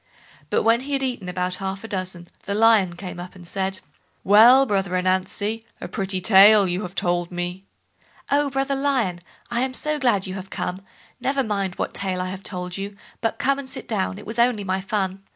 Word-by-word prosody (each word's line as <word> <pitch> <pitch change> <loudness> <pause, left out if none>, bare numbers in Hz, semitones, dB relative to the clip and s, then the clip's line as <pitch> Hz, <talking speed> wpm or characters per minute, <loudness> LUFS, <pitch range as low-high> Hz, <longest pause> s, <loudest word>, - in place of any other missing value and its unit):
But - - +1
when 230 +1 +4
he 285 +2 -5
had 270 -1 +1
eaten 240 -8 -2
about 180 0 -1
half 195 +1 -4
a - - -6
dozen, 185 -4 -3 0.2
the 200 - -2
Lion 215 -5 +4
came 180 -1 -7
up, 180 +2 -8
and 180 -2 -10
said: 190 +1 -2 0.4
"Well, 235 +7 +7
brother 195 -5 0
Ananzi, 190 +4 -1 0.2
a - - -6
pretty 195 -2 -2
tale 200 +1 +7
you 180 +2 -1
have 180 -2 -7
told 175 0 0
me." 175 +2 -4 0.7
"Oh! 285 0 +3
brother 270 +1 -1
Lion, 265 -10 0 0.3
I 235 0 +1
am 260 0 -1
so 305 +2 -1
glad 235 -8 +2
you 185 - -5
have 190 0 -7
come; 185 -1 -4 0.4
never 270 +2 0
mind 200 -4 -2
what - - -3
tale 190 -2 -2
I 185 0 -2
have 190 0 -7
told 180 -1 -5
you, 200 +1 -5 0.3
but 225 - -1
come 275 +1 +1
and 270 -2 -8
sit - - -7
down—it 195 -3 -2
was 225 +3 -5
only 235 -3 +3
my 190 0 -1
fun." 195 -1 -2
195 Hz, 205 wpm, -23 LUFS, 185-235 Hz, 0.7 s, Well